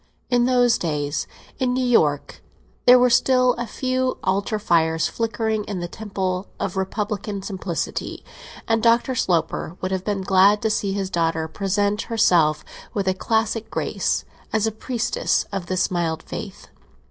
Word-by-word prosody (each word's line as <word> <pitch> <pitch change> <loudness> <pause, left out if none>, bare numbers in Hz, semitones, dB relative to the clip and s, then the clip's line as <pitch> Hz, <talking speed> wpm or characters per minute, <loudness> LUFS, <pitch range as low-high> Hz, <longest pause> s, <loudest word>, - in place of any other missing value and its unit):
In 245 -1 +4
those 245 -2 +3
days 150 -3 -2 0.3
in 255 -2 +1
New 255 0 0
York 150 - +1 0.5
there 250 +1 +9
were 250 0 +4
still 255 0 +4
a 240 0 -4
few 255 +2 -1
altar 200 +3 0
fires 160 -5 +2
flickering 220 -1 -1
in 200 -3 -4
the 175 - -3
temple 190 -2 -3
of 190 - -3
Republican 200 +1 -3
simplicity, 190 -3 -4 0.4
and 225 -1 +2
Dr. 235 +3 +3
Sloper 175 -5 -1
would 185 - -3
have 190 -1 -1
been 200 -2 -2
glad 195 +2 +5
to 220 - +2
see 200 -2 0
his 195 -1 -3
daughter 165 -1 0
present 200 +4 0
herself, 175 -9 +3 0.3
with 200 -2 -1
a 190 - +3
classic 220 +3 -1
grace, - - -1 0.3
as 220 -1 +1
a 220 - 0
priestess 240 - -1
of 195 -3 -4
this 185 0 0
mild 165 -2 -1
faith. 195 -3 -8
200 Hz, 155 wpm, -22 LUFS, 180-230 Hz, 0.5 s, there